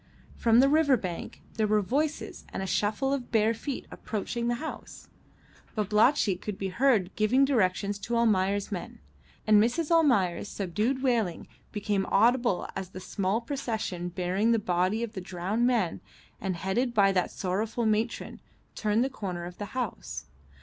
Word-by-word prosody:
From 230 +1 +4
the 270 - +5
river 290 -2 +4
bank 180 -5 -6
there 215 -1 +2
were 210 0 +2
voices 295 +9 -2
and - - -3
a - - -2
shuffle 215 +9 0
of 260 -3 -4
bare 220 -1 +3
feet 260 +4 -5
approaching 235 +3 -3
the 240 - +1
house; 315 +6 -8 0.7
Babalatchi 210 0 +3
could 200 +1 -6
be 195 -1 -3
heard 215 -3 +2
giving 250 +6 +4
directions 205 -5 +1
to 235 +4 -3
Almayer's 205 -3 +2
men, 185 -4 -5 0.5
and 215 -1 +6
Mrs. 295 +9 0
Almayer's 225 - +3
subdued 215 +8 -1
wailing 225 -9 0 0.2
became 205 -2 -1
audible 235 -1 +3
as 190 -1 -4
the 185 - -8
small 195 +3 -1
procession 225 -9 -3
bearing 185 +5 +1
the - - +3
body 185 +2 0
of 230 -1 -5
the 190 - -5
drowned 190 +7 -1
man 225 -9 0 0.4
and 190 -2 -2
headed 235 +8 -1
by 200 -2 +5
that 180 -2 +1
sorrowful 210 +5 -2
matron 220 +2 -1 0.3
turned 215 +2 +1
the - - +1
corner 185 -9 -5
of 180 0 -9
the 205 - -3
house. 75 - -4
215 Hz, 160 wpm, -28 LUFS, 190-240 Hz, 0.7 s, and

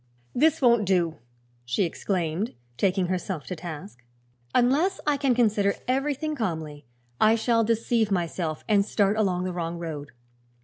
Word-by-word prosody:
"This 310 +2 +3
won't 235 -3 +5
do!" 175 -4 +1 0.5
she 120 +10 0
exclaimed, 175 +2 -2 0.2
taking 190 +5 +1
herself 180 -3 -3
to 180 - -4
task. 145 - -8 0.5
"Unless 290 +11 +3
I 295 - +3
can 275 -3 +1
consider 210 -4 +2
everything 285 +4 0
calmly 160 - -4 0.3
I 220 +1 +5
shall 230 0 +2
deceive 230 0 +1
myself 170 -4 -2
and 205 -3 +4
start 205 0 +1
along 190 -4 +1
the 185 -1 -3
wrong 170 -1 -3
road." 155 -4 -6
200 Hz, 140 wpm, -26 LUFS, 170-235 Hz, 0.5 s, won't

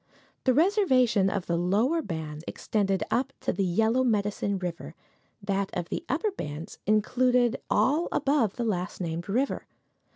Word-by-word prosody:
The 260 - +4
reservation 260 - +3
of 195 -2 -2
the 170 - 0
lower 215 - +2
bands 160 - -5
extended 195 -3 -1
up 255 - +1
to - - 0
the 200 - 0
Yellow 225 +7 +2
Medicine 205 -3 0
river; 175 -2 -5 0.5
that 195 -1 -1
of 170 - -4
the - - -3
upper 340 - 0
bands 150 - -7
included 245 +3 +2
all 300 +6 +2
above 275 -7 +1
the 240 - -2
last 180 -5 -2
named 170 0 -4
river. 255 +7 -1
210 Hz, 150 wpm, -27 LUFS, 185-255 Hz, 0.5 s, The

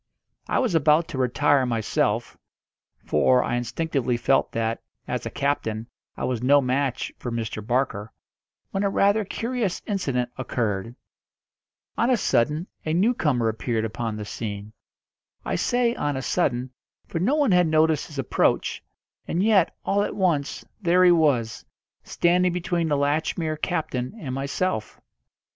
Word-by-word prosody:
I - - 0
was 250 -8 +1
about 160 +1 +4
to 135 - -4
retire 135 +2 +3
myself 120 0 0 0.7
for 125 +12 +3
I - - -1
instinctively 125 +1 -1
felt 135 +3 +2
that, 115 0 -1 0.3
as - - -3
a - - -3
captain, 115 -6 -1 0.3
I - - -5
was 125 -3 -1
no 140 +3 +5
match 130 -1 -1
for 120 - -5
Mr. 110 -2 -4
Barker 120 -3 -1 0.6
when 195 - -1
a 200 - +2
rather 200 +2 +3
curious 225 -1 -2
incident 135 - -1
occurred. 115 -3 -2 1.0
On 235 - +3
a 255 - +4
sudden 150 - +1 0.2
a 155 - -1
newcomer 165 - +2
appeared 110 0 -1
upon 110 0 -3
the 105 -1 -5
scene. 105 -1 -6 0.7
I - - -2
say 245 -1 +1
on 145 - -2
a 130 - -4
sudden, 125 0 0 0.4
for 165 - -3
no 230 - +2
one 290 -7 +2
had 180 -1 +4
noticed 155 -1 +2
his 150 - -11
approach, 135 - 0 0.4
and 175 +3 0
yet, 205 -5 +3
all 200 +1 +2
at - - -2
once, 170 -8 0 0.2
there 180 0 +4
he 180 - +7
was, 135 -9 +2 0.4
standing 180 +1 +2
between 175 -1 -1
the 145 -2 +1
Latchmere 155 +2 0
captain 155 - -2
and 135 -8 -5
myself. 140 -1 -2
145 Hz, 150 wpm, -24 LUFS, 120-175 Hz, 1.0 s, he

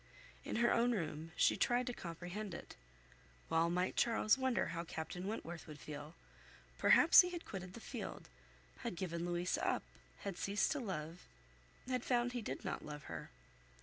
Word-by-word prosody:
In - - -3
her 235 +1 +4
own 240 +1 +3
room, 165 -4 -3
she - - +4
tried 245 +1 +2
to 245 - -2
comprehend 175 +2 -5
it. - - -9 0.8
Well 165 +1 +4
might 180 +2 0
Charles 225 -2 +4
wonder 260 -2 +1
how 170 0 -3
Captain 175 +3 -5
Wentworth 175 -6 -5
would 150 -2 -8
feel! 150 +1 -7 0.6
Perhaps - - +9
he 360 - -2
had 345 -1 -6
quitted 185 -2 -6
the - - -7
field, - - -6 0.5
had 235 -7 -3
given 170 -1 -2
Louisa 175 +1 0
up, - - +1 0.4
had 195 -3 -4
ceased 200 +1 +1
to 290 - 0
love, 170 - -4 0.7
had 255 -2 0
found 245 -1 +2
he 245 - -2
did - - -5
not - - -3
love 150 -1 -7
her. 80 -7 -6
180 Hz, 170 wpm, -37 LUFS, 165-235 Hz, 0.8 s, Perhaps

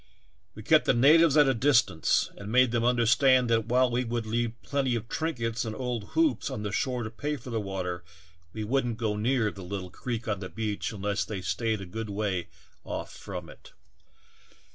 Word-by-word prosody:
We - - -9
kept - - +4
the - - +3
natives 155 +4 +6
at 145 -2 +6
a 135 - +3
distance 115 - +2
and 100 +1 -8
made 125 0 +4
them 120 -1 0
under 120 -1 +2
stand 125 +1 +4
that 115 -1 +2
while 125 +1 +3
we 125 +1 +1
would 120 -1 -3
leave 115 +1 -2
plenty 135 -3 0
of 115 0 -4
trinkets 115 -7 -2
and 110 -2 -4
old 125 -3 -3
hoops 325 - +2
on 130 -6 -5
the 105 - -3
shore 125 +3 -1
to 110 - -5
pay 145 +7 -3
for 125 -2 -9
the 115 -1 -1
water 90 -3 -4 0.5
we 110 +4 -5
would 135 +5 +1
n't 115 -2 -3
go 110 -2 -1
near 110 0 +1
the 100 - -11
little 90 0 -6
creek 120 -2 -5
on 105 -2 -1
the 95 -1 -6
beach 105 -2 -3
unless 100 -2 -2
they 95 +1 -5
staid 100 +5 -1
a - - -6
good 110 +4 -6
way 100 -4 -2 0.4
off - - -5
from 90 -3 -7
it. - - -15
115 Hz, 205 wpm, -28 LUFS, 105-125 Hz, 0.5 s, natives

